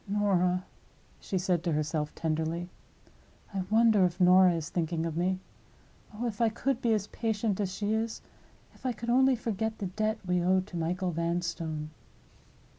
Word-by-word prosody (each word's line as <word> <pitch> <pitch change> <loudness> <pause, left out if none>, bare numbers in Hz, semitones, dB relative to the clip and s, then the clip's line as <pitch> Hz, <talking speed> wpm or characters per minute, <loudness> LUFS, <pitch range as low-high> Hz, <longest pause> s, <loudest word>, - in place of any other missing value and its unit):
"Norah!" 185 -3 +1 0.5
she 190 - -3
said 180 -2 +1
to 170 -3 0
herself, 150 0 -1
tenderly; 160 +2 -2 0.8
"I 195 - -1
wonder 220 -2 +5
if 180 0 0
Norah 180 0 +6
is 160 -2 -4
thinking 165 -1 -1
of 165 -2 -3
me? 185 +2 +1 0.7
Oh, 220 +3 -4
if 230 -1 -3
I 230 - +5
could 250 +3 -1
be 235 - +2
as 205 -2 -1
patient 215 -2 -1
as 195 -3 -1
she 205 +3 -1
is! 225 +1 -1 0.5
If - - -22
I 255 -2 0
could 235 +1 -3
only 265 +1 +5
forget 220 -1 -2
the 200 - -4
debt 215 +4 -1
we 180 -1 +1
owe 185 +2 +3
to 185 - -11
Michael 180 +2 -1
Vanstone!" 170 -2 -2
185 Hz, 170 wpm, -29 LUFS, 170-220 Hz, 0.8 s, Norah